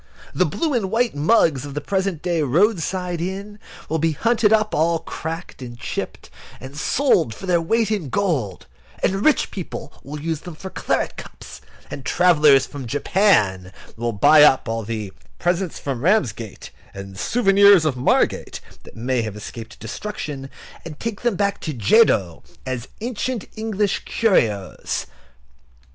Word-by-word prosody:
The - - +2
blue 320 -3 -1
and 220 -6 0
white 235 +3 +1
mugs 150 - +3
of 145 -1 -8
the - - -1
present 190 0 -2
day 175 -3 0
roadside 180 - +1
inn 200 +4 -5 0.3
will 160 +1 -1
be 160 +1 +1
hunted 220 +5 +2
up, 215 -1 +2
all 165 +2 +2
cracked 165 -1 -7
and 120 -2 -8
chipped, 120 - -6 0.3
and 135 +2 -10
sold 165 - +1
for - - -9
their 175 -2 +2
weight 220 +6 +1
in 190 -10 -2
gold, 140 - -1 0.4
and 195 +2 +1
rich 310 - +3
people 175 -5 -7
will 150 +2 -7
use 160 0 -2
them 175 0 -9
for 190 +4 -8
claret - - -1
cups; - - -11 0.3
and 140 - -6
travellers 150 -5 +4
from 140 -4 -8
Japan 115 - +2 0.2
will 120 +1 -2
buy 145 +9 +6
up 135 -4 +5
all 115 0 -2
the 105 -3 -5 0.2
"Presents 175 0 -1
from 135 -4 -4
Ramsgate," 130 - -1 0.2
and 95 0 -8
"Souvenirs 200 - +5
of 150 -4 +1
Margate," 125 - +1 0.2
that - - -15
may 125 +2 -1
have 110 -2 -5
escaped 110 +2 -9
destruction, 140 - -6 0.3
and 155 -3 -9
take 225 -3 -4
them 240 -4 +1
back 200 +1 -1
to 155 -4 -4
Jedo 105 - +3 0.2
as 130 -1 -4
ancient 240 0 -3
English 215 -2 -1
curios. 110 - 0
165 Hz, 155 wpm, -21 LUFS, 130-200 Hz, 0.4 s, buy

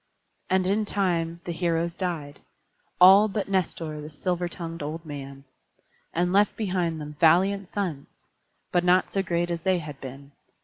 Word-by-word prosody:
And 185 0 +2
in 205 +3 +1
time 170 -4 -1
the 175 - -3
heroes 170 0 0
died, 165 -6 -4 0.6
all 195 +4 +8
but 205 0 -3
Nestor 165 -5 -2
the 150 - -8
silver 175 +3 -2
tongued 165 -1 -7
old 160 +3 -5
man; 140 -2 -8 0.7
and 175 +2 0
left 205 +1 +3
behind 180 -6 -1
them 150 0 -8
valiant 190 +4 +3
sons, 175 -9 -3 0.6
but 175 - +2
not 180 +1 +3
so 195 - +1
great 175 -2 -1
as 170 -1 -3
they 185 +1 +2
had 150 -4 -8
been. 140 +2 -9
170 Hz, 160 wpm, -26 LUFS, 155-185 Hz, 0.7 s, all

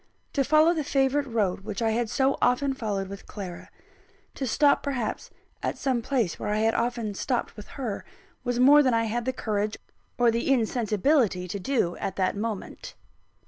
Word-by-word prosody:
To 275 - +2
follow 310 +4 +5
the 315 -3 -1
favourite 275 +1 +1
road 210 -7 0
which 200 0 -6
I 225 -1 +1
had 230 0 0
so 270 +3 +2
often 260 +3 +2
followed 205 -6 -3
with 195 +1 -9
Clara; 190 -4 -8 0.6
to 265 - -3
stop 285 +5 +3
perhaps 255 -6 -3 0.3
at - - -2
some 260 -4 0
place 230 -8 -1
where 210 - -3
I 210 - +1
had 220 +1 +2
often 235 -3 -1
stopped 240 +4 -2
with 210 -2 -10
her, 240 -7 -3 0.4
was 245 -1 -1
more 285 +4 +8
than 255 -4 +2
I 230 - +2
had 230 +1 -2
the 260 - +1
courage 210 -3 -2 0.4
or 240 -2 +4
the 235 +4 0
insensibility 225 -3 +1
to 200 +3 -4
do 195 -6 0
at 190 - -4
that 185 0 0
moment. 210 -1 -5
235 Hz, 185 wpm, -26 LUFS, 210-265 Hz, 0.6 s, more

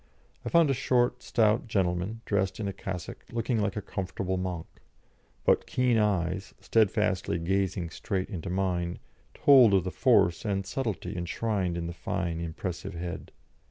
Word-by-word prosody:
I - - -3
found 170 -4 +5
a - - +3
short, 125 -1 +1
stout 110 0 +2
gentleman, 95 +1 -1
dressed 100 -1 0
in 105 - -2
a 100 - -3
cassock, 95 -3 -6
looking 115 0 0
like 100 -1 -1
a 105 - -3
comfortable 95 0 -3
monk; 90 -3 -3 0.8
but - - +3
keen 125 -3 +2
eyes, 95 -3 0
steadfastly 105 -5 +1
gazing 90 0 -1
straight 95 +3 -2
into 85 -5 -5
mine, 90 -2 -1 0.4
told 125 -8 +7
of 95 - +3
the 95 - -3
force 85 -1 +3
and 95 -2 -1
subtlety 110 -1 -3
enshrined 90 0 -1
in 85 - -3
the 85 - -4
fine, 85 -1 -3
impressive 85 +3 -5
head. 85 0 -6
95 Hz, 155 wpm, -28 LUFS, 90-110 Hz, 0.8 s, told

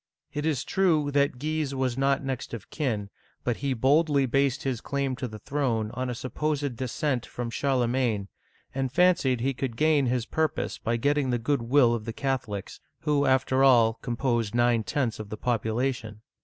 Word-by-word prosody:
It 150 +1 -1
is 145 -5 0
true 160 -7 +2
that 140 -2 +2
Guise 150 0 -2
was 130 -2 0
not 135 +1 +1
next 130 -3 -4
of 105 - -11
kin, 110 -10 -2 0.3
but 120 -2 -1
he 140 -2 -1
boldly 140 +3 +3
based 135 +1 +1
his 130 -4 -2
claim 140 -2 -1
to 125 - -3
the 110 -2 -8
throne 115 -3 -1
on 130 +1 -3
a 125 - -3
supposed 145 +2 -2
de 130 +2 -3
scent 130 -1 -1
from 120 -2 -5
Charlemagne, 120 -5 0 0.5
and 135 -1 -1
fancied 165 -7 +3
he 135 +2 +1
could 125 -2 -4
gain 150 -3 +3
his 120 -1 0
purpose 160 +2 -1
by 115 -1 -1
getting 145 +2 +1
the 120 - +1
good 125 +3 0
will 120 0 +4
of 110 -2 -3
the 115 - -4
Catholics, 125 -8 -3 0.2
who 145 -3 +2
after 130 0 +3
all 120 -4 +6
composed 120 -3 -1
nine 120 -1 +3
tenths 120 -3 -1
of 110 -2 -7
the 110 - -5
population. 115 -1 -1
130 Hz, 185 wpm, -27 LUFS, 120-140 Hz, 0.5 s, all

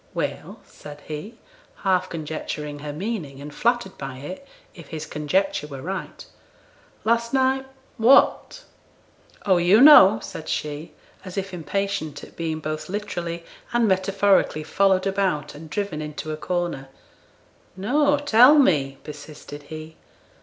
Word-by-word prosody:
'Well!' - - -4
said 145 0 -12
he, 155 +11 -7 0.5
half 185 -1 +1
conjecturing 150 -2 -5
her 145 0 -6
meaning, 160 -5 -5
and 145 +1 -9
flattered 235 0 0
by 135 -1 -6
it, 185 - -8 0.3
if 165 -6 -13
his 155 -1 -6
conjecture 150 +2 -1
were 135 -3 -8
right. 190 +2 -6 0.8
'Last 235 +2 +1
night 265 0 +1 0.3
what?' 275 - +4 0.8
'Oh, 190 -3 +4
yo' 175 +5 +5
know!' 240 -8 +9
said 160 - -8
she, 150 +2 -4 0.3
as 185 0 -9
if 195 -1 -3
impatient 180 -1 -3
at - - -13
being 160 -1 -3
both 155 +1 -5
literally 175 -4 -4 0.3
and 240 -1 +3
metaphorically 195 -3 +2
followed 190 +3 +2
about, 190 -7 -1
and 155 +2 -11
driven 185 -3 -3
into 150 +1 -6
a - - -2
corner. 175 -6 -3 0.9
'No; 285 +9 +2
tell 285 0 +6
me,' 140 - +3
persisted 145 0 -10
he. 155 0 -9
180 Hz, 130 wpm, -23 LUFS, 150-205 Hz, 0.9 s, know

